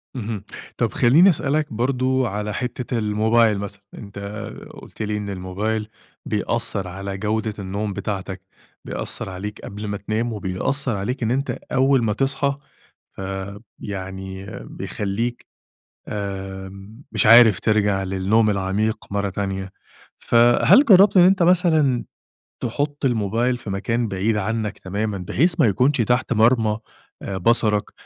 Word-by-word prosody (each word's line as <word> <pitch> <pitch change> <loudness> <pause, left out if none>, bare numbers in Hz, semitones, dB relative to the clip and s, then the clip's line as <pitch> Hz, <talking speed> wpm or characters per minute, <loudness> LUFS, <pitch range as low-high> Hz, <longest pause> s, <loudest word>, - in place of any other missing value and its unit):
اهم، 110 -4 -4 0.3
طب - - 0
خلّيني 155 +11 +6
أسألك 150 -3 0
برضه 130 +2 +1
على 105 +1 -3
حتة 125 0 -3
الموبايل 110 +1 +2
مثلًا، 100 0 -6
أنت 100 -1 -9 0.5
قُلت - - -11
لي 105 0 -1
إن 105 -1 -5
الموبايل 100 +3 -3 0.4
بيأثر 105 -2 -1
على 95 +1 -5
جودة 110 +1 -1
النوم 100 +1 -3
بتاعتك، 95 -2 -4 0.4
بيأثر - - -5
عليك 100 +3 -6
قبل 105 +1 -7
ما 100 - -3
تنام، 110 +4 -2
وبيأثر 105 +6 -1
عليك 125 +6 -3
إن 115 - 0
أنت 135 +2 -1 0.2
أول 135 -1 +3
ما 105 -2 +1
تصحى، 135 +3 0 0.6
آآ 95 +1 -5 0.2
يعني 95 -1 -6 0.2
بيخليك 110 +4 -4 0.6
آمم 95 +2 -7
مش - - +1
عارف 115 -3 +8
ترجَع 105 -3 +1
للنوم 95 +4 +2
العميق 105 +3 -1
مرة 100 0 -1
تانية، 95 -1 -4 0.5
فهل 120 - +5
جرّبت 200 -4 +6
إن 175 - +8
أنت 185 -1 +4
مثلًا 160 -8 +3 0.6
تحط 145 +4 -2
الموبايل 115 +1 +1
في 115 - -9
مكان 115 +4 -1
بعيد 100 +3 0
عنك 110 0 -2
تمامًا، 100 +2 -3
بحيث 160 - 0
ما 120 - +5
يكونش 125 +6 +2
تحت 125 +4 +1
مرمى 110 -1 +3 0.6
بصرك؟ 110 -1 +2
110 Hz, 130 wpm, -22 LUFS, 100-125 Hz, 0.6 s, عارف